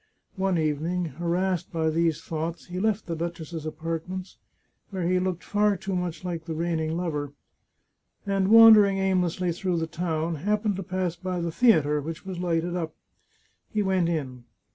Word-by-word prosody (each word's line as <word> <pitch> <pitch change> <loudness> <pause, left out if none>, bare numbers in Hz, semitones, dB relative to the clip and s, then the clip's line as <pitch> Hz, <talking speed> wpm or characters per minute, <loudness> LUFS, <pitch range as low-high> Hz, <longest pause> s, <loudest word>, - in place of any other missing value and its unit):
One 190 -1 +1
evening, 160 +3 0
harassed 175 +4 -1
by 160 -1 0
these 165 0 +1
thoughts, 165 +1 -4
he 180 0 -5
left 215 +1 0
the 170 - -3
duchess's 165 -1 -5
apartments, 165 +4 -5 0.5
where 185 -4 -2
he 185 +1 +2
looked 180 -1 -2
far 205 -1 +2
too 190 +1 -3
much 180 -1 -3
like 170 -2 -4
the 165 -1 -4
reigning 160 -1 -1
lover, 150 -5 -3 0.9
and, 195 -1 +1
wandering 215 -2 +8
aimlessly 185 -2 +1
through 175 +1 -1
the 165 - 0
town, 160 0 -2
happened 210 +4 0
to - - -3
pass 185 -1 -2
by 185 0 -3
the 170 -1 -2
theatre, 155 - +4
which 160 +5 -6
was 185 -2 -5
lighted 175 0 0
up. 165 -3 -3 0.7
He 210 -1 0
went 190 -3 +1
in. 130 -7 -3
175 Hz, 165 wpm, -26 LUFS, 160-190 Hz, 0.9 s, wandering